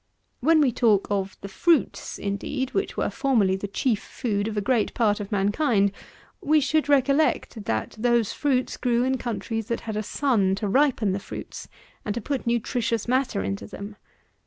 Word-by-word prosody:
When 315 Hz, +4 st, +4 dB
we 270 Hz, -4 st, +3 dB
talk 220 Hz, -4 st, +3 dB
of 195 Hz, -1 st, -2 dB
the 200 Hz, -, -6 dB
fruits, 300 Hz, -, +1 dB
indeed, 250 Hz, +7 st, -3 dB
which 395 Hz, -, -2 dB
were -, -, 0 dB
formerly 225 Hz, -9 st, +2 dB
the 195 Hz, +1 st, -4 dB
chief 215 Hz, +2 st, 0 dB
food 210 Hz, -4 st, -2 dB
of 215 Hz, -1 st, -4 dB
a -, -, +4 dB
great 230 Hz, +1 st, 0 dB
part 215 Hz, -3 st, +2 dB
of 205 Hz, 0 st, -6 dB
mankind, 205 Hz, +1 st, +2 dB, 0.5 s
we 305 Hz, +1 st, +4 dB
should 300 Hz, +1 st, +1 dB
recollect, 275 Hz, -5 st, +2 dB
that 110 Hz, -, -2 dB
those 235 Hz, -2 st, +2 dB
fruits 260 Hz, -3 st, 0 dB
grew 240 Hz, -1 st, +1 dB
in 260 Hz, 0 st, 0 dB
countries 225 Hz, -2 st, -3 dB
that 235 Hz, -, -2 dB
had 220 Hz, -2 st, -5 dB
a 215 Hz, -, 0 dB
sun 215 Hz, -5 st, +1 dB
to 205 Hz, +1 st, -3 dB
ripen 250 Hz, -3 st, +2 dB
the 190 Hz, -, -1 dB
fruits, -, -, -8 dB, 0.4 s
and 210 Hz, -, -3 dB
to -, -, -1 dB
put 270 Hz, +1 st, -3 dB
nutritious 235 Hz, -1 st, 0 dB
matter 255 Hz, -, +1 dB
into 100 Hz, +1 st, -4 dB
them. 205 Hz, +1 st, -8 dB
230 Hz, 180 wpm, -25 LUFS, 200-265 Hz, 0.5 s, When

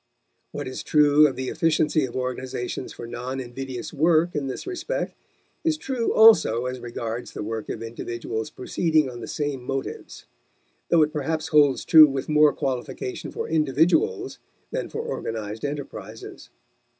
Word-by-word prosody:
What -, -, -5 dB
is 130 Hz, -, -5 dB
true 150 Hz, 0 st, +5 dB
of 135 Hz, -, -4 dB
the 130 Hz, 0 st, -3 dB
efficiency 155 Hz, -2 st, +2 dB
of 120 Hz, -, -9 dB
organizations 130 Hz, 0 st, -4 dB
for -, -, -8 dB
non 125 Hz, +3 st, -5 dB
invidious 130 Hz, +1 st, -6 dB
work 160 Hz, +3 st, +3 dB
in 145 Hz, -3 st, -2 dB
this 130 Hz, -, -5 dB
respect 375 Hz, +6 st, -3 dB, 0.5 s
is 320 Hz, -2 st, +1 dB
true 260 Hz, -6 st, -2 dB
also 160 Hz, -, +6 dB
as 125 Hz, 0 st, -4 dB
regards 120 Hz, -1 st, -5 dB
the -, -, -5 dB
work 110 Hz, +1 st, -5 dB
of -, -, -4 dB
individuals 115 Hz, -1 st, -5 dB
proceeding 155 Hz, 0 st, 0 dB
on 120 Hz, -, -9 dB
the 110 Hz, -, -6 dB
same 145 Hz, -3 st, -3 dB
motives; 135 Hz, +1 st, -5 dB, 0.6 s
though 165 Hz, -2 st, +5 dB
it 150 Hz, 0 st, -1 dB
perhaps 155 Hz, +1 st, -2 dB
holds 145 Hz, -3 st, +4 dB
true 155 Hz, -2 st, +9 dB
with 135 Hz, 0 st, -4 dB
more 150 Hz, -1 st, +5 dB
qualification 125 Hz, -1 st, -4 dB
for -, -, -4 dB
individuals 165 Hz, -, +1 dB, 0.3 s
than -, -, -3 dB
for 455 Hz, -, -4 dB
organized 110 Hz, -, -5 dB
enterprises. 145 Hz, -1 st, -7 dB
140 Hz, 150 wpm, -24 LUFS, 125-160 Hz, 0.6 s, true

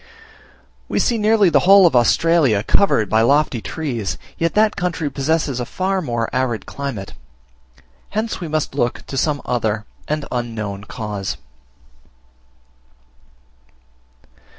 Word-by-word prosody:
We -, -, -1 dB
see 235 Hz, -2 st, +1 dB
nearly 210 Hz, -2 st, +4 dB
the -, -, +5 dB
whole 195 Hz, -1 st, +9 dB
of 165 Hz, -, +3 dB
Australia 125 Hz, -2 st, +3 dB
covered 110 Hz, -, +2 dB
by 110 Hz, +3 st, +2 dB
lofty 140 Hz, -1 st, +2 dB
trees, 120 Hz, -, -3 dB, 0.2 s
yet 165 Hz, 0 st, -1 dB
that 215 Hz, 0 st, +3 dB
country 175 Hz, -5 st, -2 dB
possesses 140 Hz, -1 st, 0 dB
a -, -, -1 dB
far 190 Hz, +1 st, -1 dB
more 120 Hz, -7 st, -2 dB
arid 125 Hz, -3 st, -1 dB
climate. 135 Hz, -9 st, -6 dB, 1.0 s
Hence 220 Hz, +2 st, -2 dB
we 170 Hz, -, -4 dB
must 155 Hz, -2 st, -2 dB
look 120 Hz, -4 st, -1 dB
to -, -, -7 dB
some 145 Hz, +2 st, 0 dB
other 110 Hz, -3 st, -1 dB, 0.2 s
and 150 Hz, -1 st, -2 dB
unknown 110 Hz, -5 st, -4 dB
cause. 105 Hz, -4 st, -5 dB
140 Hz, 125 wpm, -20 LUFS, 115-170 Hz, 1.0 s, whole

